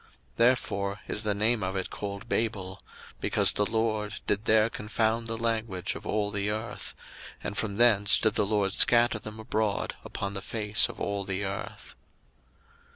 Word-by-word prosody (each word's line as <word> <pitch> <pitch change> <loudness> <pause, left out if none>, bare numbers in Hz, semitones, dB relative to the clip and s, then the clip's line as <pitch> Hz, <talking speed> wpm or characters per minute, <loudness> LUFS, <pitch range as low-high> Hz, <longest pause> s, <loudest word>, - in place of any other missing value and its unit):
01:011:009 - - -27 0.3
Therefore 105 -4 +1
is 105 - 0
the 105 -2 0
name 110 +2 +2
of 95 0 -2
it 95 -1 -3
called 100 +1 -6
Babel; 100 -5 -2 0.4
because - - +2
the 105 - +1
LORD 110 -2 -1
did 105 +2 -1
there 110 0 +4
confound 110 +1 -1
the 115 0 -2
language 110 -5 -1
of - - -9
all 105 -1 0
the 100 0 -1
earth: 110 +2 -4 0.5
and 105 - -4
from 100 -2 -2
thence 105 -3 +5
did 110 -2 +2
the 105 - +2
LORD 100 -2 +1
scatter 120 -2 +5
them 110 +1 -8
abroad 110 -1 -1
upon 100 0 -5
the 95 - -4
face 105 0 +2
of - - -9
all 100 -1 -2
the 95 +1 -2
earth. 95 0 -6
105 Hz, 170 wpm, -28 LUFS, 100-110 Hz, 0.5 s, thence